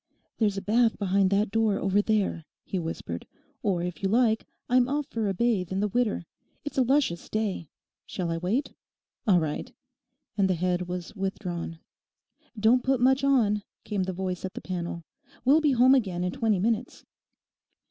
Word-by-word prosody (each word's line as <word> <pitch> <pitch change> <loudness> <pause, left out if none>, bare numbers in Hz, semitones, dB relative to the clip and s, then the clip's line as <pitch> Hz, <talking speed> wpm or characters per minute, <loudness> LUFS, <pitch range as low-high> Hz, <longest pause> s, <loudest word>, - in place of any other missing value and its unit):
'There's 205 -3 +2
a 195 - -3
bath 230 +2 +3
behind 195 -1 +2
that 200 +1 +1
door 220 -2 +2
over 195 +1 +2
there,' 205 -6 0 0.2
he 190 - -3
whispered, 160 - -5 0.3
'or 180 -4 0
if 180 -1 -5
you 195 - +1
like 225 0 +2 0.2
I'm 250 0 +3
off 290 +1 0
for 225 -6 -2
a - - 0
bathe 210 -6 +1
in 190 - -1
the 210 - +1
Widder. 215 -4 0 0.4
It's 290 - -2
a - - +6
luscious 255 - +1
day. 205 -8 -2 0.4
Shall 175 -2 -3
I 165 - -1
wait? 215 - -1 0.5
All 185 -4 +6
right,' 155 -2 -3 0.7
and 190 -1 +4
the 185 - +2
head 180 +1 -1
was 180 +2 -5
withdrawn. 180 -4 -4 0.8
'Don't 230 +4 +4
put 265 -1 +2
much 265 +2 +3
on,' 225 -7 +3 0.2
came 205 -3 -2
the 185 0 -1
voice 185 -1 -4
at 190 - -5
the - - -4
panel; 175 -2 -4 0.4
'we'll 290 +5 +5
be 295 -3 +3
home 255 +2 +6
again 190 -9 +1
in 180 - -1
twenty 215 +1 +1
minutes. 225 +5 -1
200 Hz, 180 wpm, -27 LUFS, 180-235 Hz, 0.8 s, a